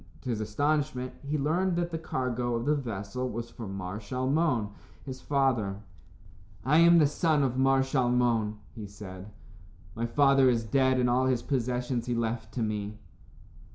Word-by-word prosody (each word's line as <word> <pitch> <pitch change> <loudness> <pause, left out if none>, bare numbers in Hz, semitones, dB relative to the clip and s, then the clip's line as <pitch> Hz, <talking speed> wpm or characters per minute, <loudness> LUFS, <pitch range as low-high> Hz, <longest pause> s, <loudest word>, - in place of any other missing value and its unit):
To 125 - -3
his 110 -2 -2
astonishment, 140 +3 -1
he 145 +2 -2
learned 170 +6 +1
that 175 0 -1
the 165 - -3
cargo 125 -5 -2
of 115 - -2
the 150 - +3
vessel 120 -2 -3
was 115 0 -5
for 115 -3 -8
Mar 95 +1 -5
Shalmon, 130 0 0 0.3
his 130 -2 -7
father. 120 -8 0 0.8
"I 150 +5 +4
am 170 0 +7
the 155 - +6
son 150 0 +1
of 130 -2 0
Mar 135 0 +3
Shalmon," 120 -5 +1 0.2
he 110 -4 -7
said. 100 -1 -10 0.6
"My 115 +3 -2
father 135 +1 +4
is 115 -2 +1
dead, 130 +3 +2
and 125 - +2
all 125 +2 +2
his 125 -2 0
possessions 125 -2 -1
he 120 - 0
left 115 0 -2
to 120 - 0
me." 105 -1 -3
125 Hz, 165 wpm, -28 LUFS, 115-140 Hz, 0.8 s, am